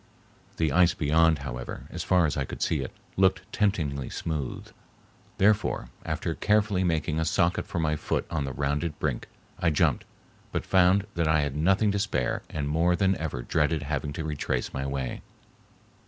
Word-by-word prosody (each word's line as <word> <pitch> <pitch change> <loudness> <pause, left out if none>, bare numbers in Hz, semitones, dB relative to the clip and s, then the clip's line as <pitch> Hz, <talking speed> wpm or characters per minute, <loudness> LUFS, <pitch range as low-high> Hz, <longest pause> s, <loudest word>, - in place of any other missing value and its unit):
The 80 -3 +1
ice 90 +3 +4
beyond, 80 -1 +3
however, - - -6
as - - -4
far 90 -2 +3
as 75 - 0
I 70 - 0
could - - -4
see 80 - +1
it, 65 - -4 0.3
looked 95 -1 +3
temptingly 80 -11 0
smooth. 75 -6 -4 0.7
Therefore, 100 - +2
after - - -2
carefully 105 -3 +2
making 80 -2 0
a - - +1
socket 85 +2 +1
for - - -5
my 80 -2 +1
foot - - -2
on 80 -4 -1
the 70 - -3
rounded 75 +3 -1
brink, - - -2 0.3
I 90 -2 +3
jumped, 75 - +2 0.5
but - - -2
found 95 +1 +4
that 85 -2 0
I 80 -1 +4
had 70 -1 -2
nothing 95 +7 +3
to 100 - -1
spare 80 - 0
and 75 -2 -3
more 85 +4 +2
than 95 0 +2
ever 70 -6 -4
dreaded 75 +3 +1
having 75 0 -2
to 80 - -4
retrace 70 -5 -2
my 65 0 -2
way. 65 -2 -3
80 Hz, 175 wpm, -27 LUFS, 70-90 Hz, 0.7 s, ice